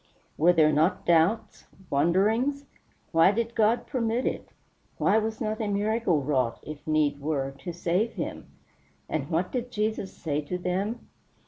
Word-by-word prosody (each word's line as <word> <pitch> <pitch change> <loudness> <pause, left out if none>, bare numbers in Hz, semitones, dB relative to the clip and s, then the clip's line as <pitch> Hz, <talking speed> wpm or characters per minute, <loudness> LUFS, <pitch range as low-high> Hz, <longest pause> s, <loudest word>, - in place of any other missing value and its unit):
Were 170 +4 +5
there 155 -3 +4
not 160 +6 +1
doubts 170 +7 +2 0.2
wonderings? 215 - +2 0.5
Why 165 +3 +5
did 230 +2 -2
God 225 +1 +2
permit 235 0 -1
it? - - -3 0.5
Why 215 - +3
was 220 0 -3
not 220 -2 -2
a 215 - -1
miracle 205 -5 +1
wrought, 130 -4 0
if 155 0 -9
need 150 -2 +1
were, 140 -2 -1
to 175 - -5
save 175 +6 0
him? - - -5 0.6
And 145 -3 -3
what 175 +2 0
did 250 -1 -3
Jesus 215 -3 -2
say 150 -2 -3
to 165 +5 -4
them? 190 +6 -3
185 Hz, 150 wpm, -27 LUFS, 155-220 Hz, 0.6 s, Were